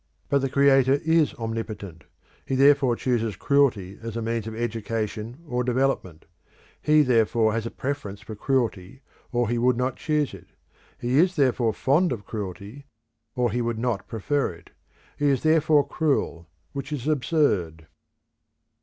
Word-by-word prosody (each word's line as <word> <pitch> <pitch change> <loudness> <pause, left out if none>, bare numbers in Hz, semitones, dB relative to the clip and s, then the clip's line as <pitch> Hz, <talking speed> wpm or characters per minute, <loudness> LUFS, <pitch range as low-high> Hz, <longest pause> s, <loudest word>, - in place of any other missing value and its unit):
But 140 - +3
the 135 0 -1
Creator 135 -1 +4
is 160 -2 +3
omnipotent; 110 -7 -6 0.4
he 135 - -2
therefore 135 -2 +4
chooses 115 -4 -1
cruelty 115 -9 +1
as 115 0 -5
a - - -2
means 115 -1 -2
of 110 - -6
education 115 +3 -4
or 125 -2 -1
development; 125 - -1 0.6
he 150 0 +4
therefore 115 -3 +2
has 115 0 -2
a - - -4
preference 130 -9 -5
for 110 +1 -9
cruelty 115 -1 -2 0.3
or 120 -1 +1
he 120 +2 0
would 125 0 +2
not 125 0 -1
choose 150 -3 0
it; - - -12 0.5
he 125 +3 +1
is 180 +2 +3
therefore 125 -5 +2
fond 155 - +2
of 105 -6 -4
cruelty 105 +6 -7 0.5
or 125 -3 +1
he 120 +3 -1
would 115 -1 -2
not 115 -4 -2
prefer 135 +5 -1
it; 85 0 -17 0.5
he 145 - +2
is 135 -3 +1
therefore 155 -2 +4
cruel, 135 - -1 0.2
which 140 0 -6
is 145 -2 -4
absurd. 125 - 0
120 Hz, 155 wpm, -25 LUFS, 110-140 Hz, 0.6 s, Creator